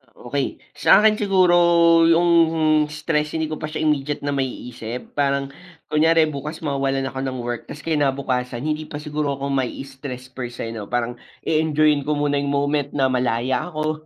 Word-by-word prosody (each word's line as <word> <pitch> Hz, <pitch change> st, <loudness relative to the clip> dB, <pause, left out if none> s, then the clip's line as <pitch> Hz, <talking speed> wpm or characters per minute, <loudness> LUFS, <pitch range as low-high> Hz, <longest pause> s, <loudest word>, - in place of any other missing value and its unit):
Okey. 135 Hz, +3 st, -4 dB, 0.2 s
Sa 200 Hz, -, +6 dB
akin 215 Hz, 0 st, +4 dB
siguro 185 Hz, -4 st, +3 dB, 0.5 s
yung 165 Hz, -2 st, +4 dB
stress 150 Hz, 0 st, -2 dB
hindi 160 Hz, -1 st, -1 dB
ko 155 Hz, -, -4 dB
pa -, -, -5 dB
siya 155 Hz, +1 st, -5 dB
immediate 150 Hz, -2 st, 0 dB
na 145 Hz, -, -3 dB
maiisip. 125 Hz, -3 st, -4 dB
Parang 140 Hz, -1 st, +1 dB, 0.4 s
kunyari 160 Hz, +1 st, +4 dB
bukas 150 Hz, +3 st, -6 dB
mawawalan 135 Hz, -2 st, -1 dB
ako 130 Hz, -, -6 dB
ng 130 Hz, -1 st, -3 dB
work, 120 Hz, -1 st, -4 dB
tapos 150 Hz, -, -9 dB
kinabukasan 135 Hz, -5 st, -1 dB
hindi 155 Hz, +1 st, -2 dB
pa 145 Hz, -1 st, -7 dB
siguro 150 Hz, -1 st, -2 dB
ako 140 Hz, 0 st, -4 dB
maistress 130 Hz, -1 st, -4 dB
per 125 Hz, -1 st, -6 dB
se 115 Hz, -, -5 dB
no. 110 Hz, -2 st, -6 dB
Parang 120 Hz, +1 st, -2 dB, 0.2 s
i-enjoyin 155 Hz, -2 st, +2 dB
ko 150 Hz, -, +1 dB
muna 145 Hz, -1 st, 0 dB
yung 140 Hz, 0 st, -1 dB
moment 145 Hz, 0 st, 0 dB
na 135 Hz, -2 st, +2 dB
malaya 125 Hz, +5 st, -1 dB
ako, 155 Hz, 0 st, -3 dB
145 Hz, 165 wpm, -22 LUFS, 130-155 Hz, 0.5 s, Sa